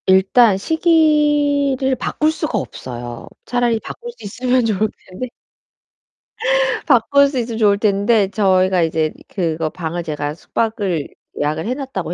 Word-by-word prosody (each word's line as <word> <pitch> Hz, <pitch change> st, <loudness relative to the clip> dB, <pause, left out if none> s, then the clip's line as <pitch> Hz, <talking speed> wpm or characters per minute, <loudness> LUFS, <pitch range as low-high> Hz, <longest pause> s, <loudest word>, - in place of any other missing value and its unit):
일단 190 Hz, +3 st, +5 dB
시기를 295 Hz, -, +2 dB
바꿀 305 Hz, +5 st, 0 dB
수가 310 Hz, -7 st, -2 dB
없어요. 120 Hz, -, -7 dB, 0.2 s
차라리 245 Hz, -2 st, +1 dB
바꿀 480 Hz, -, -8 dB
수 -, -, -14 dB
있으면 250 Hz, +4 st, 0 dB
좋을텐데. 215 Hz, +1 st, -3 dB, 1.6 s
바꿀 280 Hz, +1 st, +4 dB
수 275 Hz, -1 st, -4 dB
있으면 230 Hz, -1 st, -3 dB
좋을텐데 205 Hz, 0 st, +3 dB
저희가 185 Hz, -3 st, +2 dB
이제 160 Hz, -1 st, 0 dB, 0.2 s
그거 160 Hz, -4 st, -2 dB
방을 170 Hz, +1 st, -4 dB
제가 150 Hz, -2 st, -3 dB
숙박을 195 Hz, -2 st, -2 dB, 0.3 s
예약을 155 Hz, +3 st, -1 dB
해 245 Hz, -, 0 dB
놨다고 255 Hz, -, -4 dB
215 Hz, 275 characters per minute, -19 LUFS, 180-260 Hz, 1.6 s, 일단